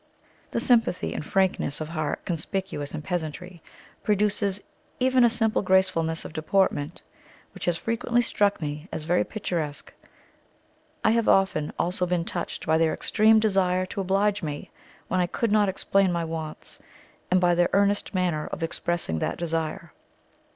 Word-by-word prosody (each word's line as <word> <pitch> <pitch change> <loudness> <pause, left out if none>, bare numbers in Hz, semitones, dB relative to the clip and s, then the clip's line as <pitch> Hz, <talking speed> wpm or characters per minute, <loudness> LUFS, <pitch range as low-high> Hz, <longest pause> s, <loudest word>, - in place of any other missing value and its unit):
The - - -1
sympathy 230 -7 +2
and - - -4
frankness 185 -5 0
of 155 -1 -5
heart 155 -3 -3
conspicuous 165 -3 -3
in 155 - -4
the - - -17
peasantry 175 0 -4 0.4
produces 205 -1 0 0.4
even 255 0 +4
a 240 - +6
simple 225 -1 +2
gracefulness 185 -4 +1
of - - -8
deportment 160 -1 0 0.5
which - - -6
has 175 -1 +1
frequently 230 +4 0
struck 205 -3 +1
me 150 +1 -5
as 155 - -4
very 175 +3 +2
picturesque; 165 -9 -4 1.1
I - - +4
have 230 0 +2
often 190 -6 +2
also 180 +1 0
been 175 -1 0
touched 175 - -4
by 160 0 +3
their 165 -1 +2
extreme 220 0 +4
desire 190 -4 +2
to 195 - -4
oblige 200 +2 +1
me, 150 -3 -5 0.4
when 185 - 0
I 180 - +2
could 230 +4 -1
not 210 -2 +4
explain 195 0 +1
my 170 -1 -1
wants, 160 -1 -6 0.5
and 185 - +4
by 175 -1 +3
their 175 0 +3
earnest 200 0 +1
manner 175 -5 0
of 165 - -5
expressing 165 - -2
that - - -2
desire. 165 -1 -3
180 Hz, 160 wpm, -26 LUFS, 160-200 Hz, 1.1 s, a